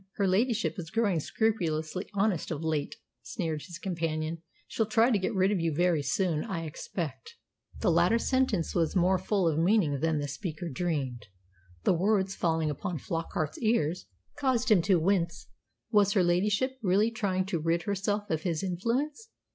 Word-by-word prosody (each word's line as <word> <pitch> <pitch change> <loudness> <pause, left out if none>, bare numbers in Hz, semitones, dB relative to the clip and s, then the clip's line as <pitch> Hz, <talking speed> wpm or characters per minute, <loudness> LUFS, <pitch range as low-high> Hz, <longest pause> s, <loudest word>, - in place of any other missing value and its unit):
"Her 200 - +1
ladyship 225 +2 +1
is 165 -3 -6
growing 205 -4 +1
scrupulously 175 -3 -1
honest 200 -4 +1
of 160 -1 -4
late," 155 -3 -1 0.3
sneered 160 -7 -3
his 175 +2 -9
companion. 165 -3 -3 0.3
"She'll 225 - -1
try 225 +3 +4
to 210 - +3
get 190 - -2
rid 190 +1 +3
of 200 - +1
you 165 -1 0
very 175 -2 +2
soon, 165 0 0
I 190 -7 -4
expect." 170 - -6 0.5
The 195 - +3
latter 175 +7 +4
sentence 250 -8 0
was 165 -1 0
more 185 +1 +3
full 190 -1 +1
of 160 -1 +1
meaning 170 -6 +2
than 160 +1 +1
the 145 0 -2
speaker 165 +3 -5
dreamed. 135 -7 -3 0.6
The - - +4
words, 195 +2 +1
falling 160 -4 0
upon 160 +4 -4
Flockart's 160 0 -3
ears, 185 -7 0 0.3
caused 255 -3 +1
him 195 -5 +6
to 185 0 +3
wince. 170 -1 0 0.4
Was 205 -2 +4
her 195 -4 +4
ladyship 210 +9 +1
really 205 +3 +3
trying 195 -5 -1
to 185 -3 -2
rid 165 +2 0
herself 205 +2 -1
of 160 -1 0
his 165 -2 -2
influence? 250 - -2
180 Hz, 170 wpm, -29 LUFS, 165-210 Hz, 0.6 s, him